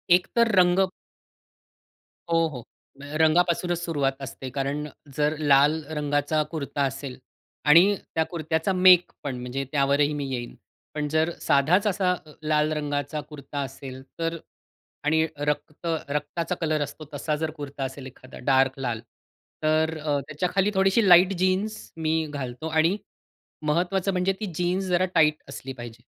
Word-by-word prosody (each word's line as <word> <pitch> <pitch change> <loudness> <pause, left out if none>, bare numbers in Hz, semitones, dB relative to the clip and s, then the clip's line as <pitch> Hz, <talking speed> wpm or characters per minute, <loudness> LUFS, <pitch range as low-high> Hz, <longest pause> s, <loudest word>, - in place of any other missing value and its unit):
एकतर 230 +6 +2
रंग 185 +1 +5 1.4
हो, 165 0 +3
हो. 125 -6 -8 0.6
रंगापासूनचं 175 +2 +3
सुरुवात 160 -5 0
असते. 135 -1 -7
कारण 140 +3 -2 0.3
जर 150 +1 +2
लाल 145 +1 +4
रंगाचा 145 +1 +1
कुर्ता 145 -3 -2
असेल 135 -2 -7 0.5
आणि 180 +7 +7 0.2
त्या 160 - +3
कुर्त्याचा 160 +2 -1
मेक 180 -1 +6
पण, 135 -3 -3
म्हणजे 125 +2 -3
त्यावरही 145 +1 +2
मी 145 -1 -3
येईन. 120 -1 -5 0.4
पण 150 -1 -1
जर 160 +2 +1
साधाच 175 +10 +3
असा 185 -2 +2
ल 155 - -14 0.2
लाल 150 0 +2
रंगाचा 145 0 -2
कुर्ता 145 -1 -7
असेल 130 0 -8 0.2
तर 165 0 -1 0.7
आणि 160 +1 +3
रक्त 150 +3 -3 0.2
रक्ताचा 150 +5 -2
कलर 155 -2 +1
असतो 145 +2 -5
तसा 150 +2 -1
जर 155 +1 -2
कुर्ता 140 -1 -5
असेल 135 0 -6
एखादा 130 0 -12
डार्क 135 0 +3
लाल, 120 -4 -2 0.6
तर 155 +1 +2
अ, 150 -2 -1
त्याच्याखाली 180 +6 0
थोडीशी 195 +3 +3
लाईट 180 +2 +7
जीन्स 190 +4 +1 0.2
मी 160 0 0
घालतो. 130 +2 -5
आणि 160 +5 +2 0.7
महत्वाचं 180 +5 +1
म्हणजे 185 +1 +1
ती 215 - -3
जीन्स 180 +3 0
जरा 185 0 +2
टाईट 155 -2 +5
असली 135 0 -7
पाहिजे. 120 -1 -10
155 Hz, 140 wpm, -25 LUFS, 140-175 Hz, 1.4 s, आणि